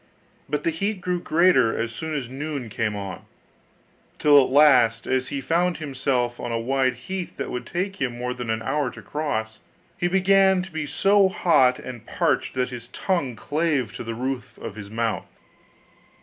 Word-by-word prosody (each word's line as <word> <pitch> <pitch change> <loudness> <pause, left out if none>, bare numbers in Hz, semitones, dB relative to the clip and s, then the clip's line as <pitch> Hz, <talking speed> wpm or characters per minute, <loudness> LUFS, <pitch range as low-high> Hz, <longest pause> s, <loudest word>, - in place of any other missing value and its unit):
But 150 0 -1
the 165 - +1
heat 200 +5 -2
grew 180 0 -1
greater 160 -9 +3
as 115 0 -1
soon 160 +5 -4
as 135 -5 -3
noon 135 -2 -5
came 110 -1 -1
on, 100 -2 -6 0.9
till 145 -2 +6
at - - -2
last, 130 -5 +5
as 130 0 0
he 140 -1 -4
found 175 +4 +1
himself 130 -5 -1
on 120 - -4
a 115 - 0
wide 130 +2 +1
heath 190 -2 -6
that - - -4
would 125 - -5
take 195 +3 -3
him 125 -3 -1
more 125 +1 -2
than 120 -2 -6
an 110 0 -1
hour 140 +2 0
to - - -11
cross, 110 -8 -3 0.4
he 175 - +2
began 190 0 +4
to 190 - -10
be 160 -2 -3
so 195 +7 +4
hot 130 -9 +3
and 125 -3 -9
parched - - 0
that 125 -1 0
his 120 -1 -8
tongue 145 -6 -1
clave 145 -1 -1
to - - -6
the 115 0 -5
roof 130 +1 -4
of - - -7
his 100 -2 -8
mouth. 115 0 -2
135 Hz, 185 wpm, -24 LUFS, 120-170 Hz, 0.9 s, till